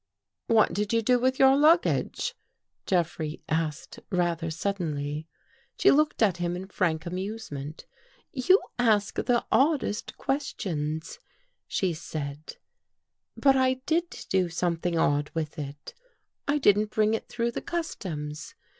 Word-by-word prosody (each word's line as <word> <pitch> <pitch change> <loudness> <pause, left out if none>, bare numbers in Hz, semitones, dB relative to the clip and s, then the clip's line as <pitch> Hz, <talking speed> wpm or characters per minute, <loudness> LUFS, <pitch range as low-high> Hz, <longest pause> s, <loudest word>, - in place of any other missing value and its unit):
" 90 - -62
What 220 -6 +4
did 205 +4 -1
you 230 0 +2
do 250 +2 +4
with 260 +1 +1
your 270 0 +6
luggage? 330 +9 +3 0.3
" - - -54
Jeffrey 165 -4 -1
asked 155 -2 -2
rather 175 -2 0
suddenly. 155 -4 -3 0.5
She - - +6
looked 300 -4 +3
at 195 -5 +3
him 175 0 -1
in 185 +1 -5
frank 170 -5 0
amusement. 180 -6 -5 0.2
" - - -34 0.2
You 380 +2 +8 0.2
ask 215 -4 +3
the 240 -1 +1
oddest 275 -7 +1
questions," 160 - -3 0.5
she 185 -3 0
said, 155 -2 -6 0.4
" - - -58 0.3
but 275 -1 +5
I 260 -1 +3
did 335 +2 -1
do 185 -2 +1
something 170 0 -1
odd 145 -1 +2
with 160 0 -3
it. 145 0 -7 0.5
I 290 +1 +2
didn't 210 -5 +4
bring 215 0 +2
it 225 - -3
through 235 0 -1
the - - -4
customs. 160 - -5
185 Hz, 140 wpm, -27 LUFS, 160-240 Hz, 0.5 s, You